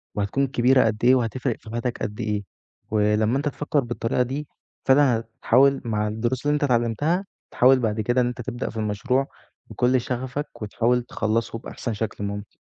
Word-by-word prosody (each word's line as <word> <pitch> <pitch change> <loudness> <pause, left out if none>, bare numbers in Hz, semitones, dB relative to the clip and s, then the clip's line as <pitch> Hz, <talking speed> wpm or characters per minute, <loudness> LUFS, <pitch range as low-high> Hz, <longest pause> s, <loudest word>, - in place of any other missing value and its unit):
وهتكون 105 +7 0
كبيرة 130 0 +4
قد 110 0 -1
إيه، 130 +1 +7
وهتفرِق 125 0 -1
في - - -13
حياتك 120 +1 -2
قد 105 +2 -4
إيه. 105 -2 -1 0.5
ولمّا 105 +3 +2
أنت 145 +1 0
تفكر 145 +1 -1
بالطريقة 120 -1 -1
دي 140 +4 -4 0.4
فعلًا، 135 -3 +5 0.2
هتحاول 135 +3 +4
مع 105 -2 0
الدروس 120 +5 -2
اللي 145 - +3
أنت 150 - -1
اتعلمتها، 130 - +1 0.3
تحاول 130 +1 +5
بعد 110 -2 0
كده 120 +4 +2
إن 120 - +1
أنت 125 0 -4
تبدأ 120 +1 -4
في - - -9
المشروع 120 +6 0 0.4
بكل 125 +1 +2
شغفك، 130 +4 -4
وتحاول 120 +3 +1
تخلصه 115 0 -2
بأحسن 120 0 -5
شكل 105 -1 -4
ممكن. 100 0 -4
120 Hz, 170 wpm, -24 LUFS, 110-130 Hz, 0.5 s, إيه